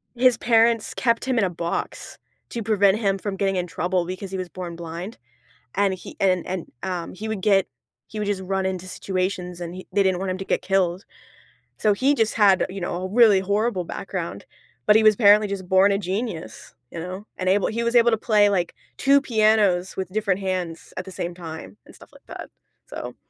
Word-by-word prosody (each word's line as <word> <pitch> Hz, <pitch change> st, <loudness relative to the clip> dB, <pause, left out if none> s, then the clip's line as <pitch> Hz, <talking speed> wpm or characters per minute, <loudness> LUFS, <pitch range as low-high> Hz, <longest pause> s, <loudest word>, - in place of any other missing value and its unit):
his 245 Hz, -1 st, +4 dB
parents 230 Hz, -1 st, +3 dB
kept 235 Hz, -1 st, 0 dB
him 260 Hz, -3 st, +1 dB
in -, -, +2 dB
a 190 Hz, -, +1 dB
box 170 Hz, 0 st, -5 dB, 0.3 s
to 235 Hz, -, -4 dB
prevent 205 Hz, -1 st, +3 dB
him 195 Hz, -3 st, +1 dB
from 195 Hz, 0 st, -4 dB
getting 195 Hz, 0 st, 0 dB
in 180 Hz, -1 st, -1 dB
trouble 175 Hz, +1 st, -1 dB
because 185 Hz, +2 st, -6 dB
he 190 Hz, -, -4 dB
was 185 Hz, -1 st, -4 dB
born 180 Hz, -2 st, -7 dB
blind, 170 Hz, +5 st, -7 dB, 0.6 s
and 195 Hz, -1 st, +1 dB
he 180 Hz, -, -11 dB
and 185 Hz, -2 st, +2 dB
and, 185 Hz, -2 st, -5 dB
um, 180 Hz, -3 st, -4 dB
he 215 Hz, +4 st, -6 dB
would 220 Hz, -3 st, -3 dB
get 195 Hz, -1 st, +3 dB, 0.4 s
he 215 Hz, -, -7 dB
would 210 Hz, -, -2 dB
just 200 Hz, -2 st, -1 dB
run 190 Hz, 0 st, -2 dB
into 185 Hz, -1 st, -4 dB
situations 185 Hz, -2 st, -3 dB
and 170 Hz, 0 st, -5 dB
he 185 Hz, -, -10 dB
they 200 Hz, -, +3 dB
didn't 190 Hz, -2 st, +1 dB
want 190 Hz, 0 st, -3 dB
him 185 Hz, -, -3 dB
to 195 Hz, -, -6 dB
get -, -, 0 dB
killed. 190 Hz, -1 st, 0 dB, 0.8 s
So, 210 Hz, -, +4 dB
he 265 Hz, +8 st, +2 dB
just 225 Hz, -5 st, +1 dB
had, 200 Hz, -4 st, +4 dB
you 195 Hz, 0 st, -7 dB
know, 175 Hz, +1 st, -3 dB
a 185 Hz, -, -2 dB
really 220 Hz, -3 st, +6 dB
horrible 200 Hz, -1 st, 0 dB
background, 170 Hz, -, -5 dB, 0.4 s
but 210 Hz, -, +5 dB
he 220 Hz, -, +3 dB
was 215 Hz, 0 st, +7 dB
apparently 210 Hz, 0 st, +6 dB
just 195 Hz, -2 st, -5 dB
born 190 Hz, +2 st, +4 dB
a 195 Hz, -, +1 dB
genius, 190 Hz, -, -5 dB, 0.2 s
you 170 Hz, -, -6 dB
know, 185 Hz, +4 st, -6 dB
and 185 Hz, -, -3 dB
able 195 Hz, +1 st, +3 dB
he 235 Hz, +1 st, -2 dB
was 235 Hz, +1 st, 0 dB
able 235 Hz, 0 st, +6 dB
to 225 Hz, -, +2 dB
play, 210 Hz, -2 st, +3 dB
like, 180 Hz, -4 st, -1 dB, 0.2 s
2 280 Hz, +1 st, +4 dB
pianos 215 Hz, -6 st, +2 dB
with 190 Hz, -1 st, -4 dB
different 200 Hz, -1 st, -1 dB
hands 185 Hz, -3 st, -4 dB
at 185 Hz, -, -4 dB
the 190 Hz, -, -9 dB
same 175 Hz, -1 st, -4 dB
time 160 Hz, -, -9 dB
and -, -, -16 dB
stuff -, -, -16 dB
like -, -, -20 dB
that, -, -, -8 dB, 0.4 s
so. -, -, -7 dB
195 Hz, 215 wpm, -23 LUFS, 180-215 Hz, 0.8 s, was